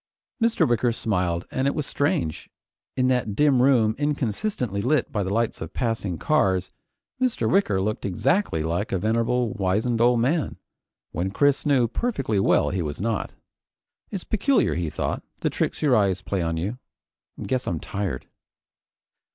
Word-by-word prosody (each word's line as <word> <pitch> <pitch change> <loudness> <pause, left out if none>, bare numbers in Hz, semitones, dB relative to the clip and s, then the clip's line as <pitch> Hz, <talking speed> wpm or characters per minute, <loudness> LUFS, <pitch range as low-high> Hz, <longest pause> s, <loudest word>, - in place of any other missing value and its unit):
Mr. 230 0 +3
Wicker 120 0 +2
smiled, 90 -7 -1
and 130 +1 0
it 140 - 0
was 150 - -2
strange, 85 - -1 0.5
in 130 0 +3
that 125 -5 0
dim 140 -1 +4
room 120 -5 +4
inconsistently 130 - -1
lit 130 +4 +1
by 105 - -1
the 95 0 -2
lights 115 +2 0
of 80 +2 -6
passing 110 -7 -1
cars, 95 - +1 0.5
Mr. 255 -2 +1
Wicker 190 - +2
looked 105 +3 -2
exactly 100 - +1
like 85 +8 -2
a 95 - +1
venerable, 115 +4 +1
wizened 110 +3 0
old 120 0 +4
man, 145 +7 0 0.5
when 90 +4 -2
Chris 145 +8 +2
knew 130 -5 +4
perfectly 135 - -1
well 95 - +3
he 95 -1 -1
was 75 -3 -4
not. 110 +1 -2 0.7
It's 195 -3 -5
peculiar, 220 - +2
he 85 0 -2
thought, - - -2 0.2
the - - 0
tricks - - -2
your 140 -4 +4
eyes 100 -3 +2
play 95 -2 -2
on 80 -1 -1
you. 100 +10 -3 0.6
Guess 130 -1 -2
I'm 85 - -1
tired. 95 -10 -4
115 Hz, 160 wpm, -24 LUFS, 95-135 Hz, 0.7 s, dim